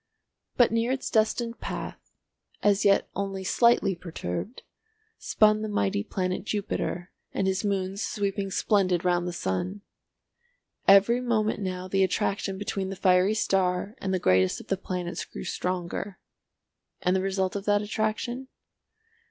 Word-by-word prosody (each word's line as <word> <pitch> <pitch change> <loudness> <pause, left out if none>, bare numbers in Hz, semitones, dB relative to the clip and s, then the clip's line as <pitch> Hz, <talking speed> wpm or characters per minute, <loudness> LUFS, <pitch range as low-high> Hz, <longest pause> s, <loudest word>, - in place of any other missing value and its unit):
But 245 - +5
near 230 +2 +1
its 265 - -2
destined 230 +1 +1
path, - - -6 0.5
as 205 0 +3
yet 195 -1 +4
only 195 -1 -3
slightly 235 0 +3
perturbed, 170 - -5 0.6
spun 215 0 +3
the 215 - -3
mighty 100 - 0
planet 185 - -2
Jupiter 200 -4 -3 0.2
and 195 - 0
his 190 +1 0
moons 195 -1 -1
sweeping 200 -2 -2
splendid 185 -3 +1
round 175 0 +2
the - - -2
sun. 175 - -3 1.1
Every 200 +5 +6
moment 220 -4 0
now 185 -1 -3
the 195 +1 +2
attraction 195 0 -1
between 195 -1 -3
the 195 - -4
fiery 185 +2 +3
star 190 -1 +1
and 190 - -2
the 190 - +2
greatest 95 - +3
of - - -13
the 195 - +2
planets 180 -2 -4
grew - - -8
stronger. 180 +2 -3 0.9
And 180 +1 +3
the 190 - +2
result 190 0 -1
of 200 0 -4
that 205 0 +2
attraction? 220 +5 -2
195 Hz, 145 wpm, -27 LUFS, 185-210 Hz, 1.1 s, Every